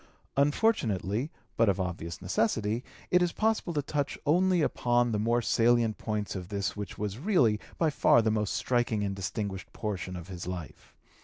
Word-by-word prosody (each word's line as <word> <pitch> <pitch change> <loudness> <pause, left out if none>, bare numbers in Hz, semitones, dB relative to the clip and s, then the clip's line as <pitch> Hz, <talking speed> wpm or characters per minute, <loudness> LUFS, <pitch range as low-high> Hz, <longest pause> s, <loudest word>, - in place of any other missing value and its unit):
Unfortunately, 140 - +1 0.3
but 115 -2 +4
of 100 -1 +1
obvious 85 -1 -4
necessity, 110 +4 0 0.3
it 180 - +5
is 175 -1 +2
possible 220 -4 0
to 145 -3 -1
touch 145 0 -2
only 180 +2 +3
upon 120 -3 +2
the 105 - 0
more 115 +2 +1
salient 115 -1 +3
points 105 -2 -3
of 90 -2 -5
this 100 -2 -2
which 105 -2 -6
was 105 +1 -3
really 135 - +3 0.2
by 160 -2 +2
far 120 -4 +4
the 110 - +2
most 105 -2 0
striking 120 -4 +1
and 100 -1 -2
distinguished 95 0 -4
portion 95 -4 -4
of 85 -1 -7
his 90 -2 -7
life. 90 -4 -7
110 Hz, 170 wpm, -29 LUFS, 100-140 Hz, 0.3 s, it